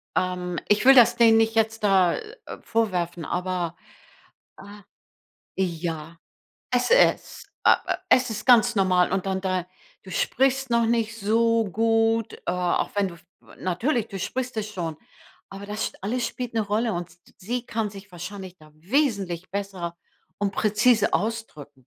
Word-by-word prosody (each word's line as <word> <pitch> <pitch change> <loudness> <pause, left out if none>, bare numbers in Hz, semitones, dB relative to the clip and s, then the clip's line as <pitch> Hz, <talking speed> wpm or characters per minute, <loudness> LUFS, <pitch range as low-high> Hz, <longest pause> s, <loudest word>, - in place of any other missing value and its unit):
ähm, 180 -1 -1
ich 210 +3 +2
will 270 - +9
das 240 -1 +7
denen 225 -1 +6
nicht 225 0 +2
jetzt 220 0 0
da, 190 -4 +4
äh, 450 +2 -10
vorwerfen, 180 -7 -1
aber 180 -2 -2 0.8
ah 205 +1 -13 0.7
ja, 165 -3 -3 0.6
es - - +1
ist - - +2
äh - - +7
äh, - - +1
es 255 -2 +4
ist 215 +2 -5
ganz 240 -1 +5
normal 185 -2 +3
und 190 0 -1
dann 190 0 -1
da 185 -2 -1 0.4
du 190 - -11
sprichst 270 +4 +1
noch 235 -1 +3
nicht 225 -1 0
so 230 +2 +2
gut, 225 +2 +1
äh, - - -14
auch 180 -1 0
wenn 200 -1 +2
du, 170 - -11 0.2
w - - -18
natürlich, 220 - -1
du 195 - -6
sprichst 250 +6 -4
es 215 -1 -3
schon, 170 -6 -4 0.5
aber 195 +1 -9
das 210 +1 -3
sch - - -18
alles 235 +4 -1
spielt 245 -1 -6
'ne 220 - +1
Rolle 215 +3 0
und 175 0 -4
s 175 - -22 0.2
sie 240 +5 -4
kann 215 -2 -2
sich 200 0 -12
wahrscheinlich 185 +1 -8
da 155 0 -18
wesentlich 195 - -1
besser 190 -3 -5 0.4
und 205 0 -1
präzise 215 +1 +2
ausdrücken. 150 - -4
205 Hz, 160 wpm, -24 LUFS, 180-230 Hz, 0.8 s, will